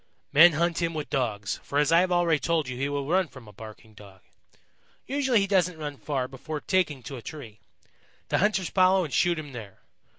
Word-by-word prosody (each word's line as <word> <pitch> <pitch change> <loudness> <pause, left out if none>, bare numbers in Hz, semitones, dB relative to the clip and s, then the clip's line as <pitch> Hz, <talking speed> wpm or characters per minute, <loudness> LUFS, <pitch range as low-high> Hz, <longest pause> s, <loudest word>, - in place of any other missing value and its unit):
"Men 165 +3 +8
hunt 170 +2 0
him 165 -1 -1
with 150 -1 -5
Dogs, 110 -8 -2
for 140 - -4
as 150 +1 +3
I 165 - +6
have 185 0 +1
already 170 -3 +2
told 165 -3 0
you 130 - -5
he 135 +3 -2
will 140 -1 -3
run 185 +3 +2
from 130 -6 -14
a 105 - -13
barking 110 +1 -12
Dog. 100 -2 -15 0.8
Usually 265 -4 +1
he - - +1
doesn't 180 -3 +1
run 145 -2 -6
far 135 -3 -3
before 150 +4 -6
taking 155 -7 0
to 135 +3 -7
a - - -9
tree. 115 -7 -10 0.7
The - - +1
hunters 200 -2 +1
follow 185 0 +4
and 145 - -8
shoot 175 +6 +2
him 150 -2 -7
there. 110 -6 -10
150 Hz, 210 wpm, -26 LUFS, 130-175 Hz, 0.8 s, Men